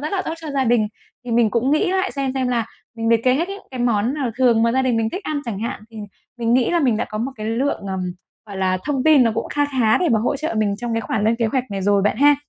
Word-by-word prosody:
rất 305 Hz, +6 st, -4 dB
là 380 Hz, -, 0 dB
tốt 325 Hz, -, -3 dB
cho 315 Hz, -2 st, -6 dB
gia 275 Hz, -2 st, 0 dB
đình, 230 Hz, -3 st, +2 dB, 0.4 s
thì 245 Hz, -, -6 dB
mình 230 Hz, -2 st, +3 dB
cũng 240 Hz, +4 st, +1 dB
nghĩ 310 Hz, +6 st, +2 dB
lại 380 Hz, 0 st, 0 dB
xem 275 Hz, -2 st, -2 dB
xem 260 Hz, -2 st, 0 dB
là 235 Hz, -2 st, 0 dB, 0.3 s
mình 225 Hz, 0 st, -1 dB
liệt 230 Hz, -1 st, +4 dB
kê 255 Hz, -, +4 dB
hết 335 Hz, +6 st, -1 dB
những 400 Hz, +1 st, -7 dB
cái 255 Hz, -2 st, -6 dB
món 235 Hz, +1 st, +1 dB
nào 275 Hz, -5 st, -2 dB
thường 235 Hz, -3 st, +4 dB
mà 230 Hz, -, +3 dB
gia 265 Hz, +1 st, +2 dB
đình 255 Hz, -3 st, +1 dB
mình 225 Hz, -1 st, 0 dB
thích 380 Hz, -, -5 dB
ăn 300 Hz, -2 st, -2 dB
chẳng 225 Hz, -5 st, -4 dB
hạn, 230 Hz, -1 st, -4 dB
thì 225 Hz, -, -13 dB, 0.4 s
mình 235 Hz, 0 st, +1 dB
nghĩ 250 Hz, -2 st, +3 dB
là 345 Hz, -, +2 dB
mình 250 Hz, -7 st, +2 dB
đã 220 Hz, -, -1 dB
có 215 Hz, -, -6 dB
một 250 Hz, +5 st, -2 dB
cái 215 Hz, -1 st, -5 dB
lượng, 235 Hz, +6 st, -1 dB
ờm, 190 Hz, -1 st, -3 dB, 0.5 s
gọi 200 Hz, -2 st, -8 dB
là, 185 Hz, -1 st, 0 dB
thông 275 Hz, -3 st, -1 dB
tin 310 Hz, -4 st, +6 dB
nó 230 Hz, -, +3 dB
cũng 230 Hz, -, -3 dB
kha 290 Hz, 0 st, +1 dB, 0.2 s
khá 220 Hz, -2 st, +4 dB
để 355 Hz, -, +1 dB
mà 230 Hz, -, +3 dB
hỗ 245 Hz, +6 st, 0 dB
trợ 310 Hz, -2 st, -3 dB
mình 205 Hz, -2 st, +1 dB
trong 235 Hz, +2 st, -4 dB
cái 225 Hz, -, 0 dB
khoản 215 Hz, -1 st, -2 dB
lên 225 Hz, +1 st, +2 dB
kế 230 Hz, -1 st, +1 dB
hoạch 255 Hz, +3 st, 0 dB
này 195 Hz, -1 st, -3 dB
rồi 200 Hz, 0 st, +3 dB
bạn 205 Hz, -, +1 dB
ha. 290 Hz, +1 st, +6 dB
240 Hz, 315 wpm, -21 LUFS, 220-275 Hz, 0.5 s, tin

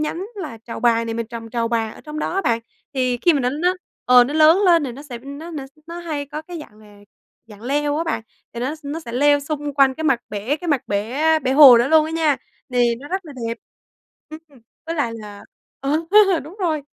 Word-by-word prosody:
nhánh 325 Hz, +4 st, -3 dB
là 305 Hz, -, -6 dB
trầu 230 Hz, +1 st, -8 dB
bà 230 Hz, -1 st, +3 dB
này 230 Hz, 0 st, -4 dB
mình 230 Hz, -1 st, -3 dB
trồng 230 Hz, 0 st, -8 dB
trầu 230 Hz, -1 st, -1 dB
bà 225 Hz, -2 st, -1 dB
ở -, -, -13 dB
trong 305 Hz, -1 st, -8 dB
đó 310 Hz, -, -2 dB
á, 390 Hz, -, +1 dB
bạn. 230 Hz, -7 st, +1 dB, 0.4 s
Thì 255 Hz, -2 st, +1 dB
khi 345 Hz, +8 st, +3 dB
mà 290 Hz, -, +1 dB
nó 250 Hz, -1 st, 0 dB
nó 345 Hz, +7 st, 0 dB, 0.3 s
ờ, 250 Hz, -1 st, +7 dB
nó 280 Hz, +4 st, -4 dB
lớn 315 Hz, +3 st, +6 dB
lên 335 Hz, -4 st, +5 dB
thì 255 Hz, -, -4 dB
nó 270 Hz, +4 st, -10 dB
sẽ 255 Hz, -5 st, -8 dB
nó 280 Hz, +7 st, -9 dB
s 275 Hz, +3 st, -26 dB
nó 340 Hz, +1 st, -7 dB
hay 310 Hz, -4 st, -4 dB
có 300 Hz, +2 st, -6 dB
cái 345 Hz, +1 st, -8 dB
dạng 210 Hz, -8 st, -14 dB
là 210 Hz, -1 st, -17 dB, 0.5 s
dạng 210 Hz, -1 st, -14 dB
leo 290 Hz, +3 st, 0 dB
á 325 Hz, -, -1 dB
bạn, 325 Hz, -8 st, -2 dB, 0.3 s
thì 235 Hz, -, -6 dB
nó 260 Hz, +5 st, -2 dB
nó 295 Hz, +3 st, -5 dB
sẽ 235 Hz, -8 st, -9 dB
leo 290 Hz, +3 st, +3 dB
xung 295 Hz, 0 st, -4 dB
quanh 270 Hz, -1 st, +4 dB
cái 315 Hz, -, -5 dB
mặt 265 Hz, -5 st, +2 dB
bể 215 Hz, +8 st, -2 dB
cái 350 Hz, +2 st, -7 dB
mặt 285 Hz, -5 st, +1 dB
bể 215 Hz, +7 st, -2 dB, 0.2 s
bể 260 Hz, -3 st, -1 dB
hồ 270 Hz, -4 st, +9 dB
đó 240 Hz, +3 st, +1 dB
luôn 315 Hz, 0 st, +5 dB
á 315 Hz, -, -5 dB
nha, 320 Hz, -3 st, +1 dB, 0.4 s
thì 240 Hz, -1 st, +3 dB
nó 285 Hz, -, -10 dB
rất 380 Hz, +2 st, -3 dB
là 305 Hz, -, -10 dB, 0.2 s
đẹp. 230 Hz, -, -4 dB, 0.9 s
Ừm, 275 Hz, -4 st, -21 dB, 0.3 s
với 330 Hz, -, -3 dB
lại 285 Hz, -8 st, -1 dB
là, 210 Hz, -2 st, -10 dB, 0.4 s
ờ, 275 Hz, -, -2 dB, 0.5 s
đúng 325 Hz, +6 st, -12 dB
rồi, 315 Hz, -5 st, 0 dB
280 Hz, 245 wpm, -21 LUFS, 235-310 Hz, 0.9 s, hồ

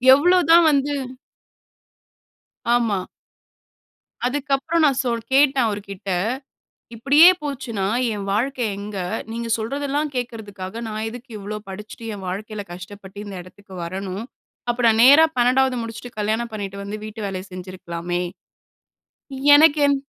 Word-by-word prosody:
எவ்வளவு 355 Hz, +5 st, +4 dB
தான் 340 Hz, 0 st, +8 dB
வந்து 285 Hz, +1 st, +1 dB, 1.8 s
ஆமா. 215 Hz, -6 st, +1 dB, 1.2 s
அதுக்கு 285 Hz, +2 st, -3 dB
அப்புறம் 330 Hz, +4 st, 0 dB
நான் 270 Hz, -2 st, +2 dB
சொல் 235 Hz, -2 st, -1 dB
கேட்டே 275 Hz, 0 st, +5 dB
ன் -, -, +3 dB
அவர்கிட்ட, 200 Hz, -2 st, -5 dB, 0.9 s
இப்டியே 290 Hz, +9 st, +7 dB
போச்சுன்னா, 245 Hz, -9 st, -3 dB, 0.3 s
என் 200 Hz, -1 st, -5 dB
வாழ்க்கை 250 Hz, +4 st, 0 dB
எங்க? 200 Hz, 0 st, -6 dB, 0.3 s
நீங்க 230 Hz, 0 st, -4 dB
சொல்றதெல்லாம் 285 Hz, +5 st, -2 dB
கேக்கறதுக்காக, 220 Hz, -3 st, -5 dB
நான் 215 Hz, +1 st, -3 dB
எதுக்கு 245 Hz, +2 st, -10 dB
இவ்வளோ 210 Hz, +1 st, -5 dB
படிச்சிட்டு, 210 Hz, +4 st, -9 dB
என் 190 Hz, -, -9 dB
வாழ்க்கையில 205 Hz, +2 st, -5 dB
கஷ்டப்பட்டு 190 Hz, +2 st, -10 dB
இந்த 200 Hz, -1 st, -8 dB
எடத்துக்கு 190 Hz, +1 st, -15 dB
வரணும்? 190 Hz, +4 st, -5 dB, 0.5 s
அப்ப 240 Hz, -, -2 dB
நான் 220 Hz, 0 st, +3 dB
நேரா 285 Hz, +5 st, +9 dB
12வது 255 Hz, +1 st, +3 dB
முடிச்சுட்டு, 230 Hz, +1 st, -8 dB
கல்யாணம் 220 Hz, +2 st, -1 dB
பண்ணிட்டு 200 Hz, -2 st, -5 dB
வந்து 210 Hz, +2 st, -5 dB
வீட்டு 215 Hz, 0 st, -8 dB
வேலைய 190 Hz, -1 st, -4 dB
செஞ்சிருக்கலாமே. 175 Hz, -1 st, -4 dB, 1.3 s
எனக்கு 310 Hz, 0 st, +6 dB
என் 280 Hz, -1 st, +2 dB
220 Hz, 125 wpm, -22 LUFS, 200-270 Hz, 1.8 s, நேரா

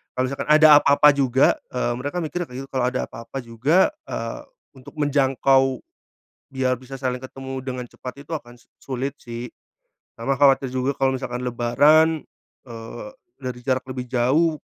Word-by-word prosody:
kalo 130 Hz, 0 st, 0 dB
misalkan 140 Hz, +2 st, -5 dB
ada 155 Hz, 0 st, +8 dB
apa-apa 145 Hz, +1 st, +5 dB
juga, 135 Hz, -1 st, +3 dB, 0.2 s
eee, 125 Hz, -1 st, -1 dB
mereka 145 Hz, +7 st, -3 dB
mikirnya 175 Hz, +2 st, -4 dB
kayak 125 Hz, -, -6 dB
gitu -, -, -24 dB
kalau 130 Hz, -2 st, 0 dB
ada 130 Hz, -, -2 dB
apa-apa 115 Hz, +4 st, -9 dB
juga, 130 Hz, +11 st, +2 dB, 0.2 s
eee, -, -, -5 dB, 0.3 s
untuk 130 Hz, -1 st, -13 dB
menjangkau 135 Hz, -2 st, +2 dB, 0.7 s
biar 130 Hz, -1 st, 0 dB
bisa 135 Hz, +1 st, -9 dB
saling 125 Hz, -1 st, -3 dB
ketemu 130 Hz, 0 st, -7 dB
dengan 125 Hz, -1 st, -4 dB
cepat 130 Hz, +4 st, -9 dB
itu 165 Hz, -, -11 dB
akan 120 Hz, -3 st, -12 dB
su -, -, -28 dB
sulit 135 Hz, +1 st, -3 dB
sih. 120 Hz, 0 st, -7 dB, 0.7 s
Sama 135 Hz, +4 st, -1 dB
khawatir 135 Hz, -2 st, +4 dB
juga 130 Hz, +2 st, 0 dB
kalau 135 Hz, 0 st, +2 dB
misalkan 125 Hz, -1 st, -5 dB
lebaran, 145 Hz, +7 st, +3 dB, 0.4 s
eee, 115 Hz, -, -9 dB, 0.3 s
dari 125 Hz, -1 st, -5 dB
jarak 130 Hz, -1 st, 0 dB
lebih 125 Hz, -1 st, -5 dB
jauh, 150 Hz, +6 st, +2 dB
130 Hz, 160 wpm, -23 LUFS, 125-140 Hz, 0.7 s, ada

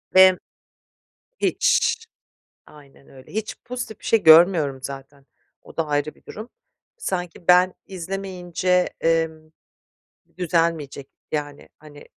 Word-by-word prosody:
ve 185 Hz, -1 st, +7 dB, 1.0 s
Hiç, 485 Hz, -2 st, +1 dB, 0.6 s
aynen 140 Hz, -2 st, -18 dB
öyle 130 Hz, -1 st, -16 dB
hiç 215 Hz, +2 st, -4 dB
pozitif 245 Hz, -3 st, -6 dB
bir -, -, -18 dB
şey 225 Hz, -, +2 dB
görmüyorum 160 Hz, -4 st, +6 dB
zaten; 135 Hz, 0 st, -9 dB, 0.4 s
o -, -, -16 dB
da 165 Hz, -, -1 dB
ayrı 145 Hz, 0 st, -1 dB
bir -, -, -27 dB
durum. 215 Hz, +3 st, -9 dB, 0.5 s
Sanki 180 Hz, -, -5 dB
ben 180 Hz, +1 st, +5 dB
izlemeyince, 185 Hz, -1 st, -2 dB
emm, 160 Hz, -1 st, 0 dB, 0.9 s
düzelmeyecek 165 Hz, -5 st, -1 dB, 0.2 s
yani. 145 Hz, -1 st, -4 dB
Hani, 145 Hz, -1 st, -14 dB
165 Hz, 110 wpm, -22 LUFS, 150-185 Hz, 1.0 s, ve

